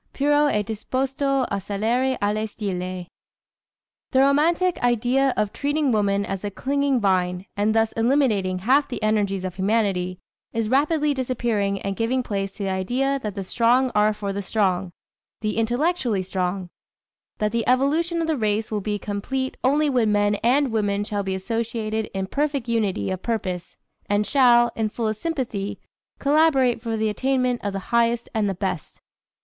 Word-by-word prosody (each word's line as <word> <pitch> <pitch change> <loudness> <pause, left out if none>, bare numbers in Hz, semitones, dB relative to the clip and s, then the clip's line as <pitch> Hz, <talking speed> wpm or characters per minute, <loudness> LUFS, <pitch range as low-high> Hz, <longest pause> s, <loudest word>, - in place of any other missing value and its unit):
"Puro 290 +1 +3
e 210 -5 +1
disposto 265 +5 -1
a 200 - -1
salire 230 +7 0
alle 215 +2 0
stelle." 185 -4 -4 1.0
The 260 - +3
romantic 330 +6 +2
idea 245 +3 +2
of 210 -1 0
treating 290 -1 0
woman 200 -2 +1
as 195 -1 -4
a 205 - -2
clinging 280 +4 0
vine, 185 -2 0
and 210 +2 +1
thus 225 0 +3
eliminating 225 -7 +1
half 260 +10 +3
the 245 - -5
energies 200 -3 +1
of 185 - -4
humanity, 190 -3 0 0.4
is 225 -1 -1
rapidly 295 +3 +2
disappearing 235 -6 -1
and 195 0 -2
giving 245 +4 0
place 195 -3 -3
to 205 - -6
the 195 - -1
idea 255 +9 0
that 210 -4 -4
the 195 - -3
strong 245 +6 +2
are 210 0 +4
for 205 -2 -4
the 200 - -3
strong 190 -3 0 0.5
the 215 -1 -1
intellectually 240 - 0
strong; 185 -1 -3 0.7
that 210 0 0
the 230 0 -1
evolution 310 +7 +2
of 325 - -1
the 315 -2 0
race 215 -1 0
will 210 -1 -1
be 210 +1 -2
complete 240 +7 -3
only 295 +4 +3
when 245 -6 +2
men 205 0 +2
and 260 +2 +3
women 205 -2 0
shall 205 -1 -2
be 190 -1 -2
associated 220 +1 -2
in 190 0 -1
perfect 280 +2 -1
unity 215 -5 0
of 185 -1 -4
purpose, 185 -7 -3 0.3
and 205 +1 +2
shall, 240 -3 +5
in 220 -1 0
fullest 215 -1 -3
sympathy, 245 -11 -3 0.4
collaborate 280 -5 +3
for 225 -2 -2
the 220 0 +1
attainment 255 +2 0
of 205 - -1
the 195 - -4 0.2
highest 235 0 +2
and 215 -3 +1
the 195 - -2
best. 185 -3 -4
225 Hz, 165 wpm, -23 LUFS, 200-260 Hz, 1.0 s, shall